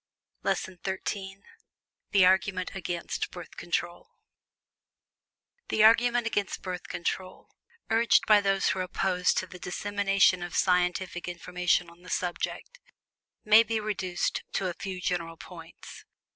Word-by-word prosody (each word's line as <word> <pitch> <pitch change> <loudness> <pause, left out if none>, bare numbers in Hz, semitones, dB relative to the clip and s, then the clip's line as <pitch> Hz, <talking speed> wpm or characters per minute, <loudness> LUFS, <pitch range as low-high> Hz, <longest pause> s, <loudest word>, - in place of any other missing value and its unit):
LESSON 185 -2 -2
XIII 195 0 -4 0.7
THE 195 -2 +5
ARGUMENT 185 0 +2
AGAINST 175 -2 -3
BIRTH 175 -2 -10
CONTROL 175 0 -3 1.6
The 215 - +3
argument 235 +2 +5
against 205 -3 -2
Birth 180 -1 -5
Control, 185 +1 -4 0.4
urged 230 +1 +4
by 210 -1 +6
those 195 -1 +1
who 190 - -1
are - - +1
opposed 180 0 0
to - - 0
the 180 0 -12
dissemination 195 0 +1
of 175 -1 -6
scientific 180 -1 +1
information 180 0 0
on 170 +1 -17
the 180 - -13
subject, 185 - -3 0.7
may 215 +1 +8
be 225 -1 -1
reduced 190 -4 -2
to 195 - -1
a 180 - -2
few 185 +1 -6
general 170 -2 -2
points. 165 -2 -12
185 Hz, 130 wpm, -28 LUFS, 180-200 Hz, 1.6 s, may